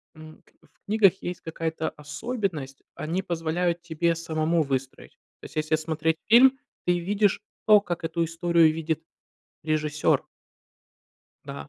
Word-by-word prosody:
м, 155 0 -13
как - - -31
бы, 165 - -24
в 150 - -39
книгах 200 -3 +3
есть 175 -1 -5
какая-то 160 0 -3
особенность: 150 - -4
они 165 +5 -2
позволяют 170 0 -1
тебе 170 0 0
самому 165 0 0
выстроить. 135 -2 -4 0.3
То - - -11
есть, - - -12
если 155 0 +1
смотреть 160 0 -1
фильм, 255 +4 +7 0.3
ты 175 0 +2
видишь 200 +3 +1 0.3
то, 210 -1 +8
как 175 -4 -4
эту 165 +1 -1
историю 165 -1 +3
видит 160 0 -2 0.6
режиссёр. 155 -1 +1 1.2
Да, 140 0 -8
165 Hz, 140 wpm, -26 LUFS, 155-175 Hz, 1.2 s, то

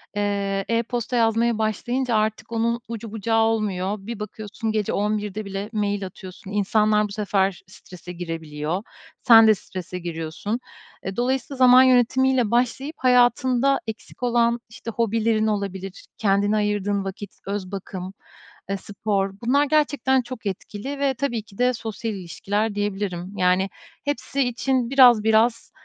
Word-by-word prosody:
eee, 200 -1 -1
e-posta 235 +1 -1
yazmaya 230 0 +2
başlayınca 235 +3 -1
artık 215 +1 -1
onun 235 +1 0
ucu 225 -2 -6
bucağı 225 +1 +1
olmuyor. 210 -3 0
Bir 215 +2 -7
bakıyorsun, 215 +1 -5
gece 215 -2 -1
23.00'de 210 0 -1
bile 195 +2 -5
mail 205 -2 -1
atıyorsun. 190 +2 -10
İnsanlar 210 +1 +2
bu - - -13
sefer 195 -2 0
strese 180 -1 -12
girebiliyor. 165 +1 -4 0.4
Sen 225 -2 +9
de 215 - +6
strese 180 -1 -7
giriyorsun. 170 +6 -4 0.5
Eee, 190 - -4
dolayısıyla 260 +2 -1
zaman 255 0 +8
yönetimiyle 255 -1 +3
başlayıp 255 +5 0
hayatında 255 +1 +3
eksik 220 +3 -8
olan 235 -1 +2
işte 230 +1 -7
hobilerin 225 -1 +1
olabilir, 195 -2 -4
kendine 205 0 +2
ayırdığın 205 -1 0
vakit, 195 +1 -6 0.2
öz 200 -2 -4
bakım, 190 -1 -6 0.7
spor... 200 -1 -2
Bunlar 275 +5 +3
gerçekten 285 -3 +2
çok 240 -2 -9
etkili. 210 +8 -5
Ve 275 -1 +2
tabii 240 -4 -2
ki 200 -2 -18
de 250 +1 +3
sosyal 225 0 -4
ilişkiler 205 +3 -2
diyebilirim. 200 -2 -3
Yani, 185 +1 +2 0.4
hepsi 285 -1 -2
için 245 0 0
biraz 245 -5 +7
biraz, 225 +1 +2
215 Hz, 135 wpm, -23 LUFS, 195-240 Hz, 0.7 s, Sen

